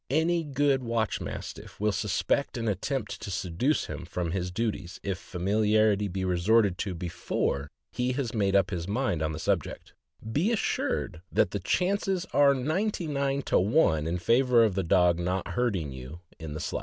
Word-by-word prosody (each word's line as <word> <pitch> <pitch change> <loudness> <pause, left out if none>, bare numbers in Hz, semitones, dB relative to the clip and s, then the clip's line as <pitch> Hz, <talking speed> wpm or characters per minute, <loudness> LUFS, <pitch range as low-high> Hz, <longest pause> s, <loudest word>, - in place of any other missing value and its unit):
Any 165 +4 +2
good 140 -2 +1
watch 115 -2 -1
Mastiff - - -7
will 105 +1 +2
suspect 105 +7 0
an 115 -1 -2
attempt 105 +3 -2
to - - -6
seduce 95 - 0
him - - -6
from 85 -2 -3
his 90 0 -2
duties 100 -2 -3
if 95 -2 -2
famil 95 +4 -1
iarity 105 -2 +3
be 95 0 -2
resorted 95 +2 +3
to 95 -3 -2
before 85 -4 -2 0.2
he 125 +1 -1
has 125 -4 -2
made 100 -3 +1
up 95 -1 +3
his 85 -2 -3
mind 105 -6 0
on 80 0 0
the 80 - -5
subject; - - -2 0.4
be 165 - +1
assured 225 - -1
that - - +2
the - - -2
chances 190 -1 0
are 140 -1 +5
ninety 170 +9 -1
nine 140 -2 -1
to - - +2
one 90 - +3
in 85 +2 -1
favor 120 +5 +4
of 110 -4 +2
the 95 - 0
dog 90 0 +3
not 90 +2 -2
hurting 100 - -1
you 65 +6 -9 0.2
in 80 -2 -6
the - - -4
slightest. 80 - -3
105 Hz, 180 wpm, -28 LUFS, 90-135 Hz, 0.4 s, are